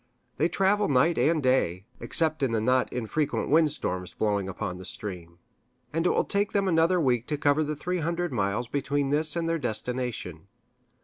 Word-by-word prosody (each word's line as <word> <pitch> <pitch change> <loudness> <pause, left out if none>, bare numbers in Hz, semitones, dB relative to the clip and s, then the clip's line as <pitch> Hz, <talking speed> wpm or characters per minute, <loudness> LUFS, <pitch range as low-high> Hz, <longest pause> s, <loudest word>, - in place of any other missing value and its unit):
They 165 - +2
travel 200 +2 +2
night 145 +5 +3
and 155 -1 +2
day, 95 -8 +1
except 155 -2 +1
in 130 -4 +1
the 110 - +2
not 125 +3 +1
infrequent 125 +5 -2
wind 155 +1 +4
storms 90 -11 -3
blowing 100 -3 -1
up 95 - -9 0.3
stream; 85 -5 -6 0.6
and 165 +2 +1
it - - +3
will - - +2
take 205 0 0
them 200 -1 +1
another 170 +1 +3
week 125 -6 +1
to 150 - -1
cover 145 +1 +2
the 150 0 -3
three 180 +5 -3
hundred 170 -1 -2
miles 100 +2 -1
between 140 +1 -1
this 155 +2 +1
and 170 -1 -1
their 165 0 0
destination. 110 - -3
145 Hz, 180 wpm, -27 LUFS, 115-165 Hz, 0.6 s, wind